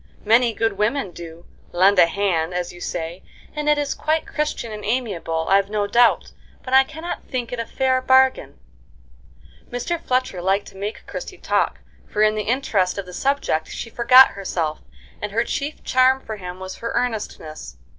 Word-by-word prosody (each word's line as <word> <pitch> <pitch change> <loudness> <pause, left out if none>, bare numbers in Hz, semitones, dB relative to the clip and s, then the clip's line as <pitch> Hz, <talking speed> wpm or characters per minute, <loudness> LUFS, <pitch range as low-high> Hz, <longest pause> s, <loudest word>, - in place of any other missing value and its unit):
Many 230 +2 +4
good 225 -3 -1
women 210 -1 0
do 170 0 -11 0.3
'lend 185 +2 +4
a 170 - +7
hand,' 175 -3 -1
as 180 0 -3
you 175 - -13
say, 170 +1 -4 0.3
and 300 0 -1
it 300 - +4
is 290 -1 -1
quite 315 +1 -1
Christian 300 -6 -3
and 210 -1 -7
amiable, 195 -9 -2
I've 195 +1 +3
no 210 -1 0
doubt; 235 +3 +3 0.3
but 255 - -6
I 265 0 +8
cannot 320 +5 -7
think 245 -3 -4
it 245 - -4
a 230 - -3
fair 260 -1 +1
bargain." 260 - +3 1.1
Mr. 280 +8 -3
Fletcher 255 -8 -1
liked 195 +3 +1
to - - -19
make 205 +3 -6
Christie - - -7
talk, - - 0 0.3
for 210 - +1
in 215 0 +4
the 215 - -2
interest 210 -8 +1
of 200 - -4
the 180 - -11
subject 270 - 0
she 230 - -6
forgot 250 +3 +7
herself, 170 -6 -3 0.4
and 210 -1 -4
her 230 +2 +2
chief 285 +5 -4
charm 260 +1 +3
for 220 -4 -7
him 180 -1 -8
was 190 0 -7
her 230 - -4
earnestness. 160 - -4
215 Hz, 180 wpm, -22 LUFS, 185-255 Hz, 1.1 s, I